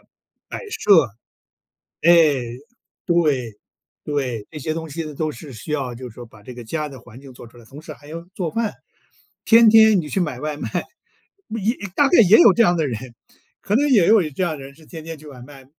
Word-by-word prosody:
设， - - -34 2.0
哎， 160 -5 +5 0.6
对， 150 - 0 0.5
对， 130 -8 -3
这 155 - -10
些 155 +3 -3
东 160 -1 -6
西 165 +3 -5
呢， 155 -1 -8
都 155 0 -2
是 140 +3 -11
需 115 +8 -9
要， 135 -5 -2
就 125 +1 -9
是 - - -16
说 120 - -10
把 110 -2 -18
这 125 - -10
个 120 -1 -10
家 150 +6 -4
的 135 -3 -11
环 120 +1 -15
境 135 -2 -14
做 120 - -13
出 120 - -19
来， 115 - -16
同 140 +5 -13
时 155 -1 -9
还 145 +1 -18
要 165 +2 -7
做 175 -4 -3
饭。 225 -2 -2 0.7
天 230 -1 +6
天 220 -3 +6
你 150 - -9
去 195 - -1
买 150 -7 -3
外 150 +1 -4
卖， 115 - -5 0.8
也 225 +2 -1 0.2
大 285 - +4
概 350 - +5
也 210 +2 +6
有 215 - +7
这 235 - +4
样 175 -3 +3
的 155 -3 0
人， 115 -4 -3 0.6
可 205 - -1
能 290 +4 +2
也 210 -10 +4
有 220 -2 +5
这 185 +6 -3
样 160 -4 -2
的 135 - -10
人 140 +1 -12
是 155 +1 -19
天 160 -1 -10
天 165 -1 -7
去 155 - -16
外 130 -4 -12
卖 135 0 -14
150 Hz, 235 characters per minute, -21 LUFS, 130-175 Hz, 2.0 s, 有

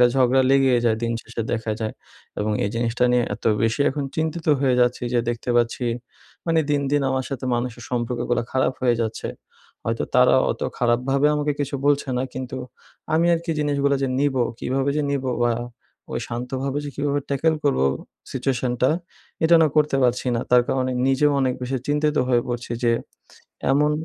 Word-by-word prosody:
একটা 125 - +8
ঝগড়া 130 0 +4
লেগেই 135 -2 +4
যায় 110 -1 +3
দিন 115 0 0
শেষে 115 - -5
দেখা 110 -1 -1
যায় 110 -1 -2 0.5
এবং 105 +1 0
এই 100 - 0
জিনিসটা 120 +1 0
নিয়ে 125 -1 +3
এত - - -14 0.2
বেশি 115 +4 +1
এখন 145 0 -3
চিন্তিত 160 +1 -2
হয়ে 130 -3 +3
যাচ্ছি 120 0 +2
যে 120 - +4
দেখতে 120 +1 -2
পাচ্ছি 120 +1 +1 0.6
মানে 165 -1 +3
দিন, 145 -1 +2
দিন 145 0 +2
আমার 130 -1 -1
সাথে 130 -1 -4
মানুষের 120 0 -3
সম্পর্কগুলা 120 0 -1
খারাপ 130 0 +2
হয়ে 120 -2 +3
যাচ্ছে। 110 -1 -4 0.6
হয়তো - - -1
তারা - - +6 0.2
অত - - -4 0.2
খারাপভাবে 125 +4 +2
আমাকে 150 0 0
কিছু 145 0 -2
বলছে 145 -1 +2
না - - 0
কিন্তু 130 0 -5 0.6
আমি 165 +2 +3
আরকি 170 +1 -3
জিনিসগুলা 140 -1 +1
যে 135 - +1
নিবো, 135 -3 +2 0.2
কীভাবে 135 +2 0
যে 150 - +1
নিবো 135 -2 -1
বা 120 - +3 0.6
ওই - - -2
শান্তভাবে 130 +3 -3
যে - - -4
কীভাবে 145 0 0
ট্যাকেল 160 +4 +2
করবো 135 - +2 0.5
সিচুয়েশানটা 125 -1 0 0.5
এটা 170 +1 +6
না - - +5
করতে 150 -2 +3
পারছি 125 +1 +1
না। - - 0
তার 125 0 +6
কারণে 130 -1 0
নিজেও 145 +2 +3
অনেক 130 -1 +1
বেশি 130 +2 -2
চিন্তিত 150 +1 +1
হয়ে 120 -2 +3
পড়ছি 120 0 -4
যে 115 - +4 0.8
এমন 150 +2 +3
130 Hz, 175 wpm, -23 LUFS, 120-145 Hz, 0.8 s, একটা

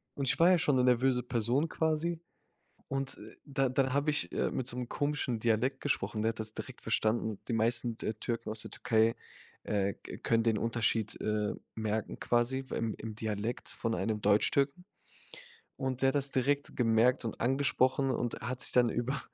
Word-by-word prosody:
und 140 -1 -2
ich - - +4
war 170 +2 +6
ja 185 - +6
schon 150 -4 +2
'ne 125 - +3
nervöse 125 0 +3
Person 125 +6 +1
quasi. 160 +1 0 0.7
Und 135 0 -2 0.3
da 135 -2 0
dann 130 0 +1
habe 145 +2 +2
ich, 150 - -1
äh, - - 0
mit 130 - -3
so 125 - -1
'nem 125 -1 -4
komischen 145 -5 -1
Dialekt 120 +4 +1
gesprochen, 125 -6 -1
ne, - - -1
der - - +3
hat 115 - -9
das 110 0 -3
direkt 130 - -8
verstanden. 110 -1 0
Die - - -1
meisten 115 +1 +2
Tür 110 0 -4
Türken 115 -2 -3
aus 110 0 -5
der - - -9
Türkei, 110 0 +2 0.5
äh, 100 -2 0
k - - -10
können 115 -1 +2
den 110 -2 +2
Unterschied, 115 -1 0
äh, 105 -1 0 0.2
merken 110 -1 -2
quasi 120 +3 +1
beim 115 -4 -3
im 110 -1 -6
Dialekt 110 +2 -3
von 115 -1 -2
einem 110 -2 -1
Deutschtürken. 140 - +2 0.9
Und 130 -2 -2
der 135 - +4
hat 135 - +1
das 140 -1 +1
direkt 140 +2 0
gemerkt 115 +1 +3
und 115 - -5
angesprochen 130 +1 +2
und 120 -1 -2
hat 130 +3 -3
sich - - +3
dann 125 -1 +5
über 120 +4 -2
120 Hz, 190 wpm, -31 LUFS, 110-135 Hz, 0.9 s, war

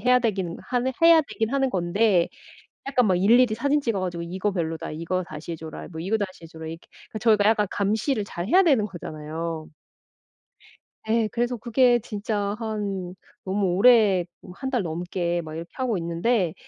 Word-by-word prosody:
해야 250 0 +4
되기는 195 -8 -2
한 245 0 -1 0.2
해야 330 -1 +8
되기는 230 -6 -3
하는 270 -1 +2
건데 185 -1 +2 0.6
약간 255 -3 +2
막 185 - +3
일일이 225 +5 +4
사진 285 +6 +1
찍어 230 -7 -1
가지고 175 -2 -3
"이거 185 +4 -2
별로다. 165 -3 -3
이거 165 +4 -2
다시 155 +2 -7
해 - - -3
줘라." 160 0 -8
뭐 160 - -7
"이거 195 +7 0
다시 190 -4 -5
해 - - -9
줘라." 160 0 -10
이렇게 165 +1 -9 0.2
그 215 - -5
저희가 215 -3 +3
약간 215 -2 +2
감시를 215 +4 0
잘해야 200 - +2
되는 270 - +3
거잖아요. 160 -3 -6 1.4
예. 225 -1 +2
그래서 240 +1 -1
그게 240 +1 +3
진짜 205 -1 -3
한 200 -5 -4 0.3
너무 195 +1 0
오래 210 -4 +5 0.2
뭐 180 - -12
1 265 -1 -4
달 250 -5 +1
넘게 175 +1 -2
막 155 -1 -8
이렇게 165 +2 -7
하고 255 -5 -1
있는데 170 +2 0
200 Hz, 340 characters per minute, -25 LUFS, 175-235 Hz, 1.4 s, 해야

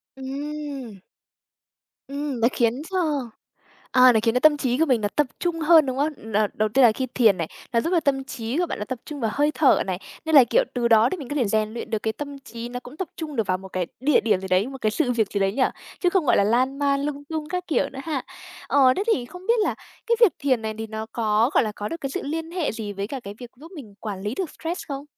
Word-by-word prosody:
Ừm. 275 -4 -6 1.1
Ừm, 280 -2 -4
nó 230 - +5
khiến 240 +3 +1
cho, 380 - -2 0.9
à, 255 -1 +7
nó 220 - +3
khiến 230 0 +2
cho 250 - +2
tâm 300 +1 +6
trí 255 -3 0
của 325 - +4
mình 255 -6 +2
nó 205 - 0
tập 295 - +3
trung 345 -2 -1
hơn, 320 -1 +6
đúng 260 -1 -2
không? 280 -6 -3
Đ - - +1 0.2
Đầu 215 0 +1
tiên 260 +4 +4
là 230 - +7
khi 260 +4 -3
thiền 220 -6 +5
này, 165 -2 -3 0.2
nó 230 - +3
giúp 330 - -2
cho 355 -2 +3
tâm 270 -3 0
trí 240 +1 -4
của 355 - +2
bạn - - -5
nó 210 - -3
tập 255 +2 -5
trung 295 -2 -7
vào 225 -3 0
hơi 295 +1 +2
thở 290 -4 +4
này, 185 -2 -2 0.3
nên 320 - 0
là, 275 -4 +9
kiểu, - - +2
từ 240 -1 +1
đó 225 0 +6
thì - - -2
mình 285 -8 -8
có 290 - -4
thể 265 - +2
rèn 215 +1 0
luyện 230 0 -6
được 220 - 0
cái 220 - 0
tâm 285 +1 -7
trí 235 -3 -8
nó 245 0 -5
cũng 250 +4 -12
tập 375 0 -4
trung 305 -3 -6
được 225 - 0
vào 185 -1 0
một 190 0 -11
cái 185 -2 -2
địa 280 +1 +4
điểm 215 -5 +1
gì 190 - -6
đấy, 185 +3 +2
một 270 - -8
cái 215 - +1
sự 250 +2 0
việc 220 -4 0
gì 200 - -1
đấy 195 0 +2
nhỉ, 260 +4 0 0.4
chứ 355 - +3
không, 355 -5 +1
gọi - - +4
là, - - +4
lan 255 +6 +1
man 280 -1 +1
lung 285 0 -4
tung 310 0 -5
các 360 +1 -3
kiểu 285 -3 0
nữa 270 - -8
ha. 290 -4 -2 0.5
Ờ, 260 -3 +5
thế - - 0
thì 245 - -3
không 360 +9 -12
biết 465 0 +3
là - - 0 0.3
cái 470 - +3
việc 460 -7 +7
thiền 260 -5 +1
này 220 0 -3
thì 225 - -4
nó 220 0 -5
có, 220 +1 +2
gọi - - +4
là, 215 - -3
có 210 0 -5
được 330 - -6
cái 275 - -3
sự - - -3
liên 325 +3 -4
hệ 345 -3 -1
gì 215 -2 -5
với 200 0 -4
cả 265 +3 -5
cái 200 -3 -8
việc 245 -2 -10
giúp 320 +7 -14
mình 255 - -10
quản 205 -4 -5
lý 210 +3 -3
được 365 -1 -3
stress 335 +3 -3
không? 275 -1 -5
260 Hz, 285 wpm, -24 LUFS, 220-295 Hz, 1.1 s, là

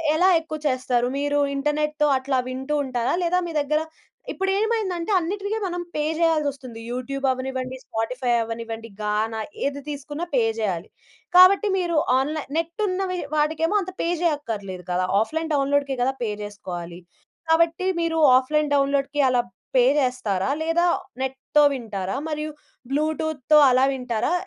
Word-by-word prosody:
ఎలా 360 +4 +4
ఎక్కువ 310 -1 -6
చేస్తారు? 255 -2 +1
మీరు 290 0 +1 0.2
ఇంటర్నెట్‌తో 300 +1 0
అట్లా 260 0 0
వింటూ 265 +3 -3
ఉంటారా? 245 -2 -1
లేదా 360 +2 +2
మీ 330 - -6
దగ్గర 305 +2 0 0.5
ఇప్పుడేంమైందంటే 390 -2 0
అన్నిటికి 400 +5 -3
మనం 355 -1 -3
పే 300 - 0 0.2
చేయాల్సొస్తుంది. 285 -8 0
యూట్యూబ్ 270 +3 -3
అవ్వనివ్వండి, 260 0 -4
స్పాటిఫై 245 +3 -2
అవ్వనివ్వండి, 230 0 -6
గానా 215 +1 -1 0.3
ఏది 280 0 -2
తీసుకున్నా 295 +3 -5
పే 245 - +4 0.2
చేయాలి. 190 -4 -2 0.5
కాబట్టి 375 +4 +7
మీరు 345 -3 0 0.2
ఆన్‌లైన్ 300 +2 -3
నెట్ 335 +6 -2
ఉన్నవి 370 -1 -1 0.2
వాడికేమో 315 +4 +1
అంత 370 0 -6
పే - - 0
చేయక్కర్లేదు 220 - -2
గదా! 180 +1 +1
ఆఫ్‌లైన్ 320 +8 -2
డౌన్‌లోడ్‌కి 280 -1 +1
గదా! 265 +2 +1
పే 225 - -1
చేసుకోవాలి. 175 -4 -7 0.5
కాబట్టి 335 +2 +3 0.2
మీరు 330 -1 0 0.2
ఆఫ్‌లైన్ 300 +3 0
డౌన్‌లోడ్‌కి 280 +1 +1
అలా 245 -1 +3 0.3
పే 250 -1 +6 0.2
చేస్తారా? 250 -6 -1
లేదా 330 +2 +2 0.4
నెట్‌తో 265 +3 +1
వింటారా? 210 -6 -4
మరియు 305 0 -3 0.4
బ్లూటూత్‌తో 310 0 +1
అలా 255 +1 +4
వింటారా? 250 +2 -1
280 Hz, 130 wpm, -23 LUFS, 245-325 Hz, 0.5 s, కాబట్టి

